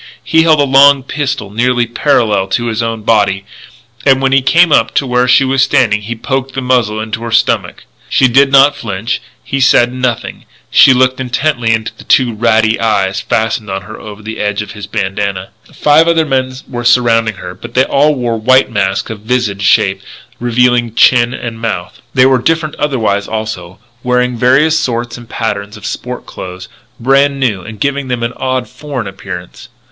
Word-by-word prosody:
He 160 - +3
held 160 -2 +3
a - - +4
long 140 0 +5
pistol 140 -6 -4
nearly 120 +2 +1
parallel 110 -4 +1
to 120 +5 -1
his 115 -1 -2
own 115 -2 -3
body; 100 -3 +1 0.6
and 135 -1 +4
when 135 0 0
he 135 0 +4
came 165 +5 +3
up 115 -5 +2
to 140 - +1
where 125 0 +1
she 130 +2 +5
was 135 0 +1
standing 125 -6 +2
he 115 +3 -6
poked 135 +3 -3
the 135 - -2
muzzle 120 -4 0
into 110 +1 -4
her 115 - -5
stomach. 115 - 0 0.3
She 130 - +3
did 135 +3 +3
not 140 +1 +5
flinch; 115 -4 -4 0.2
he 135 - -3
said 120 -1 +4
nothing; 125 -2 -3 0.3
she - - +6
looked 130 0 +2
intently 125 -2 -1
into 110 0 -1
the - - -14
two 125 -3 +2
ratty 110 0 +1
eyes 100 -4 0
fastened 110 -2 -2
on 95 0 -4
her 110 +2 -10
over 105 0 -11
the 110 +1 -7
edge 105 0 -1
of - - -11
his 105 -1 -9
bandanna. 95 0 -3 0.2
Five 150 +2 +3
other 165 -1 +2
men 130 -2 -1
were 120 -2 -5
surrounding 115 -2 +2
her, 90 -1 -8
but 120 +5 -12
they 130 - +4
all 145 +3 +2
wore 120 -3 -2
white 130 +2 +3
masks 95 -1 -1
of 110 - -7
vizard 110 -3 -2
shape, 100 - +2 0.4
revealing 120 -1 +1
chin 120 0 +4
and 115 -3 -6
mouth. 110 -6 -4
They 130 0 +5
were 130 -2 +3
different 160 +1 0
otherwise, 110 -8 -1
also, 110 -5 -5 0.2
wearing 125 0 0
various 135 +7 +3
sorts 120 -1 -3
and 120 -2 -14
patterns 105 -2 -4
of 105 - -11
sport 125 +4 -6
clothes, 90 0 -9 0.3
brand 135 +3 +2
new, 110 -8 0
and 110 +2 -10
giving 140 +2 -2
them 125 -2 -3
an 115 +1 -2
odd, 130 -1 -2
foreign 140 -6 -6
appearance. 95 -2 -9
120 Hz, 185 wpm, -13 LUFS, 110-130 Hz, 0.6 s, she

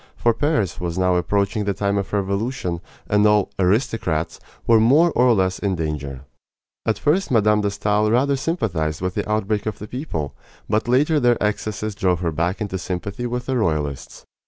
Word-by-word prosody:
For 120 - +2
Paris 110 - 0
was 85 0 -3
now 90 -1 +2
approaching 100 +4 0
the 100 -1 -1
time 100 0 0
of 100 - -5
revolution, 100 -2 -2 0.3
and 105 0 +3
all 105 -1 +3
"aristocrats" 95 - 0 0.3
were 115 -1 +5
more 145 +10 +5
or 125 -2 +4
less 95 -1 0
in 100 -2 0
danger. 75 -5 -4 0.7
At 110 -3 +2
first 165 - +1
Mme. 105 -3 +3
de 100 - +1
Stael 105 +1 +1
rather 135 +5 +2
sympathized 90 - -1
with 90 -1 -1
the 105 +1 -3
outbreak 105 0 0
of 105 - -3
the 105 - -8
people; 115 - -4 0.3
but 110 +2 0
later 150 +5 +3
their 120 -3 +3
excesses 105 0 -2
drove 90 -3 0
her 85 -2 0
back 85 +5 -1
into 100 -3 -3
sympathy 100 +6 -4
with 125 +1 -3
the 130 - -1
royalists. 75 - -2
105 Hz, 180 wpm, -22 LUFS, 90-115 Hz, 0.7 s, were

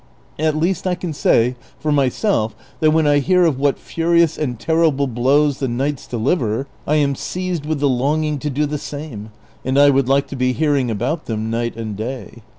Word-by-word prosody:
At 155 -1 +1
least 175 +3 0
I 180 - +1
can 175 -2 -5
say 125 -3 +2 0.2
for 155 - -2
myself 140 - +1 0.2
that 155 - +4
when 155 0 +3
I 145 -1 +4
hear 180 +4 +3
of 145 -6 +1
what 140 0 +2
furious 170 -1 +1
and 125 -6 -3
terrible 160 -3 +2
blows 135 +3 +2
the 135 - -1
knights 135 +3 -2
deliver, 120 0 0 0.2
I 150 - +2
am 145 -2 +2
seized 180 +1 -4
with 155 -2 -1
the 145 - +2
longing 145 +3 0
to 150 - -3
do 145 +2 0
the 150 0 -3
same, 140 -9 -7 0.3
and 130 +1 0
I 145 0 +7
would 135 -1 +1
like 140 +1 +3
to - - -6
be 130 -1 +1
hearing 145 -4 +1
about 125 +9 -2
them 110 0 -3
night 115 0 -2
and 110 -2 -4
day." 120 +2 -6
140 Hz, 200 wpm, -19 LUFS, 125-155 Hz, 0.3 s, I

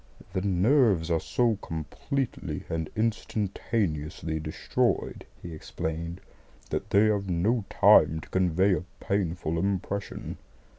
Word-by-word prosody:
"The 95 - 0
nerves 100 - +3
are 80 - +3
so 115 +4 +1
completely 95 - -3
and 80 -1 -2
instantaneously 100 -7 -1
destroyed," 75 0 -1 0.2
he 85 - -6
explained, 80 +3 -5 0.5
"that - - -2
they 100 +2 +5
have 100 -2 +1
no 100 +6 +1
time 80 - +6
to - - -13
convey 95 +1 +3
a 90 - -1 0.2
painful 85 -4 -1
impression." 100 +1 -3
95 Hz, 110 wpm, -28 LUFS, 80-105 Hz, 0.5 s, time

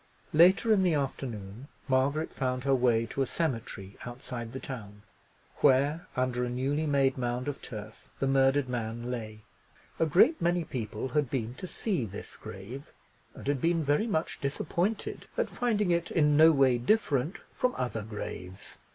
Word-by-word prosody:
Later 185 +7 +6
in 200 - +4
the 180 -4 +3
afternoon, 125 -4 -4 0.2
Margaret 140 +4 +1
found 125 -2 -1
her 135 0 +3
way 120 -3 +3
to 135 - -3
a 135 - +1
cemetery 115 - -3
outside 120 -1 -6
the 130 - -5
town, 105 -7 -8 0.5
where, 145 +4 +3
under 125 -1 0
a 125 - -1
newly 140 +5 -1
made 135 -2 +2
mound 125 +1 -2
of 145 - -4
turf, 110 -1 -9
the - - 0
murdered 135 0 +3
man 120 0 -3
lay. 110 -3 -5 0.6
A 165 - +3
great 195 - +5
many 175 0 +2
people 115 -2 -4
had 150 -3 +1
been 120 -3 -2
to 185 - -7
see 185 - -1
this 100 -2 -7
grave, 110 +9 -9 0.4
and - - -10
had 140 -2 0
been 165 -1 +2
very 145 +10 +2
much 160 -7 -1
disappointed 170 +9 -2
at - - 0
finding 210 -6 +1
it 170 0 +1
in 150 -3 +3
no 160 +2 +8
way 135 -4 +4
different 150 - +1 0.2
from 250 0 0
other 120 -3 -2
graves. 100 -3 -7
135 Hz, 165 wpm, -29 LUFS, 120-155 Hz, 0.6 s, no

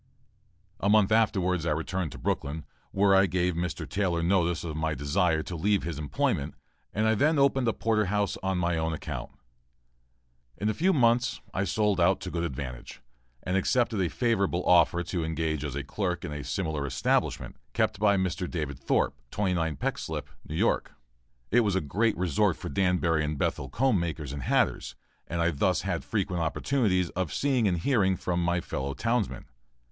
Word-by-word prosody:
A 100 - +1
month 105 -1 +4
afterwards, 95 -6 +2
I 85 - -1
returned 80 +1 -2
to - - -9
Brooklyn, 75 +2 -3 0.2
where 100 0 +3
I 95 0 +5
gave 90 +1 0
Mr. 85 +1 -3
Taylor 90 -4 0
notice 85 -2 +1
of 80 -3 -4
my 80 0 -1
desire 80 +3 +1
to 90 - -6
leave 100 +4 +1
his 80 -2 -4
employment; 75 -3 -1 0.4
and 110 +2 0
I 110 - +4
then 150 +8 +2
opened 135 -2 +3
a 115 - +2
porter 110 -2 +1
house 100 +1 0
on 95 -1 -1
my 85 -1 0
own 80 0 -1
account. 75 - -5 1.3
In 105 - 0
a - - +1
few 185 - +2
months 120 -4 +2
I 95 - 0
sold 105 -2 +1
out 90 +2 +4
to 95 -1 -5
good 85 -1 -2
advantage 65 -5 -6 0.4
and 90 - -1
accepted 110 +2 +1
a 90 - +1
favorable 100 -7 0
offer 85 0 +4
to 85 -1 -3
engage 80 -2 -2
as 70 -2 -4
clerk 90 +2 -2
in 75 - -5
a 75 -1 -5
similar 80 -6 -2
establishment, 65 - 0 0.2
kept - - 0
by 100 -1 +4
Mr. 90 -1 -1
David 75 -6 -4
Thorp, - - +1 0.2
29 90 -6 0
Peck - - -2
Slip, - - -5 0.2
New 75 - -5
York. - - +1 0.6
It 120 - +5
was 105 -5 +2
a - - +3
great 105 +8 0
resort 90 -6 +1
for - - -6
Danbury 85 -2 +1
and 75 0 -2
Bethel 65 - -1
comb 120 - +2
makers 80 -5 -4
and 70 - -5
hatters - - 0 0.3
and 85 0 -2
I 85 +1 +2
thus 70 - +1
had - - -2
frequent 90 -2 -1
opportunities 90 - +1
of 90 -3 -2
seeing 130 -6 +1
and 90 -3 +1
hearing 95 -1 +2
from 90 -1 -1
my 85 0 +1
fellow 70 -2 -4
townsmen. 115 - -1
90 Hz, 185 wpm, -28 LUFS, 80-105 Hz, 1.3 s, I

